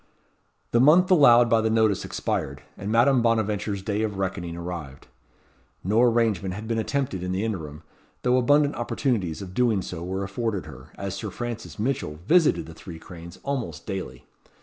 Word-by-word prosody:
The 120 - +3
month 170 +8 +5
allowed 120 -8 +7
by 115 -1 +3
the 110 - +1
notice 110 -3 +2
expired, 70 +2 -3
and 100 +2 -5
Madame 120 +3 +4
Bonaventure's 105 -3 0
day 105 +1 -1
of 105 -3 -2
reckoning 95 -3 -3
arrived. 85 -6 -7 0.8
No 105 +5 +2
arrangement 115 -6 +2
had 110 +2 -7
been 115 0 -1
attempted 125 -5 -2
in 90 0 -3
the 95 +4 -1
interim, 80 -8 -5 0.4
though 125 0 +3
abundant 145 +3 +3
opportunities 115 - -2
of 90 -1 -9
doing 115 -4 +2
so 85 -2 -6
were 95 +2 -3
afforded 100 -3 -3
her, 70 -3 -11
as 100 -1 -5
Sir 105 +1 -5
Francis 120 +1 -6
Mitchell 105 - -2
visited 165 - +3
the 80 - -10
Three 80 +1 -10
Cranes 85 0 -11
almost 120 - -4
daily. 95 -3 -6
105 Hz, 170 wpm, -25 LUFS, 90-120 Hz, 0.8 s, allowed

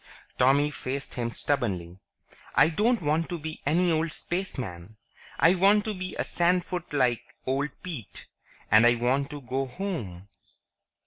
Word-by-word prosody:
Tommy 140 +3 +4
faced 135 0 -5
him 120 -1 -2
stubbornly. 95 -10 -1 0.6
"I - - +6
don't 215 +4 +1
want 155 +3 +1
to 175 - -3
be 155 0 -7
any 175 +4 +3
old 160 0 0
spaceman. 110 - -4 0.4
I 165 - +5
want 200 +3 +4
to 215 - -2
be 185 -1 -5
a - - -1
sandfoot 180 0 0
like 125 -5 +2 0.2
old 135 +3 0
Pete. 155 - -7 0.5
And 110 +3 +7
I 120 - +5
want 130 +4 0
to 145 -1 -7
go 130 +1 -2
home." 125 - -5
145 Hz, 145 wpm, -27 LUFS, 120-175 Hz, 0.6 s, And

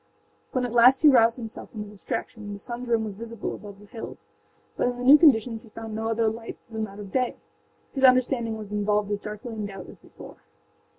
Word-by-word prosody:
When 255 -1 0
at 240 - -4
last 250 +4 +6
he - - +8
roused 235 -4 +6
himself 225 -3 -8
from 215 -2 -6
his 205 - -11
abstraction 210 +1 -5
the - - -6
sunâs 240 +4 -7
rim 230 -2 +2
was 215 -2 -4
visible 230 +1 -6
above 205 -2 -10
the 205 - -15
hills, 225 +2 -9 0.5
but - - +1
in 245 0 -2
the 245 - -5
new 270 +4 +9
conditions 235 -7 +4
he 225 - -16
found 225 0 -8
no 220 +1 -2
other 225 0 +1
light 225 +1 -4
than 220 -1 -2
that 200 -1 -12
of 205 -2 -9
day; 255 -2 0 0.6
his 270 - -3
understanding 255 -3 +4
was 210 -2 -9
involved 210 0 0
as 205 - -1
darkly 210 +3 -7
in 210 -2 -4
doubt 195 -2 -9
as - - -12
before. - - -13
225 Hz, 225 wpm, -26 LUFS, 210-245 Hz, 0.6 s, new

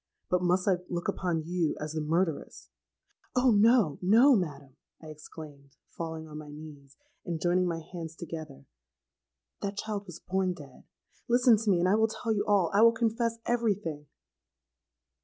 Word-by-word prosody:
But 180 0 +2
must 180 +1 +1
I 190 -2 +4
look 175 -1 -3
upon 170 -4 -1
you 170 -2 -1
as 150 0 -4
the 160 - -2
murderess——.'—'Oh! 175 - -2
no, 215 - +4
no, 235 +9 +6
madam,' 145 - -4 0.2
I 155 - -11
exclaimed, 150 -2 -12
falling 160 -1 -6
on 150 0 -8
my 150 -1 -10
knees, 145 -2 -12 0.3
and 170 -3 -4
joining 180 +2 +2
my 170 -1 -2
hands 165 -1 -8
together; 160 - -8 1.0
'that 200 0 -4
child 205 -1 -4
was 175 -1 -9
born 190 -1 -1
dead. 140 -6 -14 0.4
Listen 245 0 +5
to 215 0 -2
me, 185 - +4
and 175 - +2
I 190 - +3
will 220 +1 +4
tell 225 +1 -4
you 205 -1 0
all; 200 -5 +3
I 200 - +4
will 230 0 +7
confess 230 0 0
every 235 -3 +1
thing!' 155 -6 -7
180 Hz, 165 wpm, -29 LUFS, 155-210 Hz, 1.0 s, will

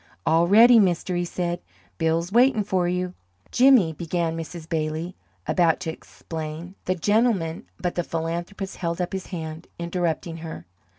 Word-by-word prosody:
"All 165 +1 +4
ready, 230 +5 +8
mister!" 180 -2 +1
he 175 - 0
said. 175 0 -3 0.4
"Bill's 165 +2 +1
waitin' 240 -1 +4
for 185 -3 0
you!" 180 0 -1 0.4
"Jimmy," 250 -11 +5
began 165 0 -2
Mrs. 165 0 -7
Bailey, 160 +2 -2 0.3
about 170 -3 +2
to 165 -3 -2
explain, 160 +2 -7
"the 185 - +1
gentleman 200 -3 +1
" - - -41
But 180 -1 -1
the 175 - -1
philanthropist 170 +4 -4
held 170 -1 -2
up 180 0 -2
his 190 -1 -4
hand, 160 -2 -6
interrupting 170 -1 -2
her. 160 - -8
175 Hz, 155 wpm, -24 LUFS, 165-185 Hz, 0.4 s, ready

